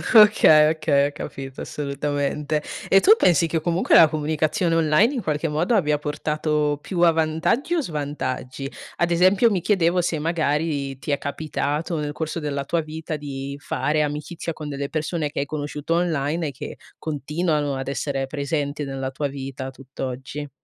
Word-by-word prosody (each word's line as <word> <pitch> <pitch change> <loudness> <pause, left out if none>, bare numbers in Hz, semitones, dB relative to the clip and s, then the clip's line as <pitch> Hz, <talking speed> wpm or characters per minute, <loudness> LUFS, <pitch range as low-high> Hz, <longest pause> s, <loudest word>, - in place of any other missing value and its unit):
Okay, 160 -8 +8
okay, 145 -3 +2
ho - - -6
capito, 135 -2 -7
assolutamente. 145 +1 -2 0.2
E 195 - +6
tu 415 - +6
pensi 170 -1 +4
che, 160 0 0
comunque, 170 +3 +2
la 160 - +9
comunicazione 155 +2 0
online, 165 - +3
in 240 - -1
qualche 155 +1 -1
modo, 170 +10 0
abbia 150 -6 +2
portato 150 0 -1
più 180 -3 -4
a 170 -1 +7
vantaggi 160 - 0
o 335 - +2
svantaggi? 140 - -4 0.3
Ad 175 0 +1
esempio, 185 +6 +5
mi 190 - +1
chiedevo 180 -3 +2
se, 165 -2 -1
magari, 150 -3 -1
ti - - -8
è 140 - +2
capitato, 150 +2 -2
nel 145 0 -2
corso 160 +1 -3
della 140 -2 -2
tua 170 - 0
vita, 155 0 -5
di 140 -1 -6
fare 150 +1 0
amicizia 150 +3 -4
con 150 -1 -7
delle 140 0 -3
persone 155 -1 -2
che - - -3
hai 140 - 0
conosciuto 150 +2 -3
online 160 -2 0
e - - -6
che 130 - -8 0.2
continuano 150 -1 -1
ad 135 0 -5
essere 135 0 -2
presenti 145 +1 -2
nella 135 -1 -3
tua 145 +1 -2
vita 135 -1 -6
tutt'oggi. 135 +2 -6
150 Hz, 165 wpm, -23 LUFS, 140-165 Hz, 0.3 s, la